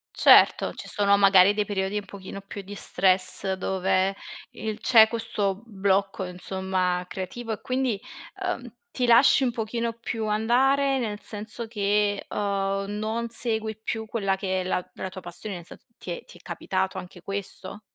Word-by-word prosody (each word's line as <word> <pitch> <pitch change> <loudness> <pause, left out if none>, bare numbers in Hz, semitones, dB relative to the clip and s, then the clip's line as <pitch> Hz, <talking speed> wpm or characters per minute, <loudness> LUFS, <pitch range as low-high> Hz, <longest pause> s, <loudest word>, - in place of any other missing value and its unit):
Certo, - - +6
ci - - -9
sono 200 -1 +3
magari 195 0 +6
dei 210 0 +1
periodi 195 0 -2
un 205 - -3
pochino 195 0 -9
più 200 +1 -8
di 205 +2 -9
stress 190 0 +2
dove, 190 0 +1 0.4
il 220 -1 -4
c'è 225 -3 +7
questo 215 -3 -2
blocco 195 -2 0
insomma 180 0 -2
creativo 220 +5 -5
e - - -7
quindi, 255 -5 -1 0.4
uhm, 310 -9 -3 0.2
ti 250 - 0
lasci 250 +3 +6
un 245 - +2
pochino 230 0 -2
più 230 -1 -4
andare, 265 +6 +2
nel 210 -4 -3
senso 215 +2 -6
che, 205 -2 0
uhm, 195 -1 -1
non 225 +2 -2
segui 220 -2 -2
più 220 0 -3
quella 205 -3 0
che 190 -1 -1
è - - -3
la 180 -1 -1
la 190 - -5
tua 185 0 -9
passione, 180 +3 -5
nel 170 -1 -9
sen - - -11 0.2
ti 180 - -7
è 170 - -6
ti - - -14
è - - -19
capitato 190 +1 -2
anche 180 -1 -9
questo? 195 +1 -6
200 Hz, 165 wpm, -26 LUFS, 190-225 Hz, 0.4 s, c'è